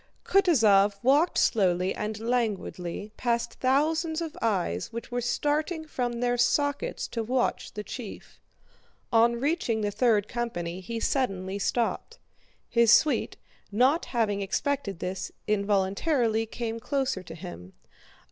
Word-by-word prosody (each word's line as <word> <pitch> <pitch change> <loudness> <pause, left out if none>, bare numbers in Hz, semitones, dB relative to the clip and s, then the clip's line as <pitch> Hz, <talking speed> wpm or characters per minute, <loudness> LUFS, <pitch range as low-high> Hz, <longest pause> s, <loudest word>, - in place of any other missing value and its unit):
Kutúzov 220 - +4
walked 290 +7 +3
slowly 185 -3 +2
and 215 +1 -4
languidly 215 -5 -2
past 235 -1 -1
thousands 315 +5 +1
of 330 -2 -5
eyes 180 - -1
which 230 +2 -7
were 245 0 -1
starting 300 +6 -1
from 250 -5 -2
their 245 0 +1
sockets 285 - +1
to 230 - -3
watch 245 +3 -1
their 210 - -4
chief. 225 -1 -9 0.7
On 235 +1 +5
reaching 275 -6 0
the 205 -1 0
third 215 -2 +2
company 185 -8 -3
he 225 +5 -5
suddenly 195 -7 -1
stopped. 240 - -1 0.5
His 235 -1 +4
suite, 300 +5 +3 0.3
not 255 +10 +3
having 215 -4 0
expected 200 0 -1
this, 180 +2 -4
involuntarily 210 - +1
came 230 0 -4
closer 265 -4 -1
to 165 -3 -10
him. 160 - -9
230 Hz, 125 wpm, -27 LUFS, 200-265 Hz, 0.7 s, On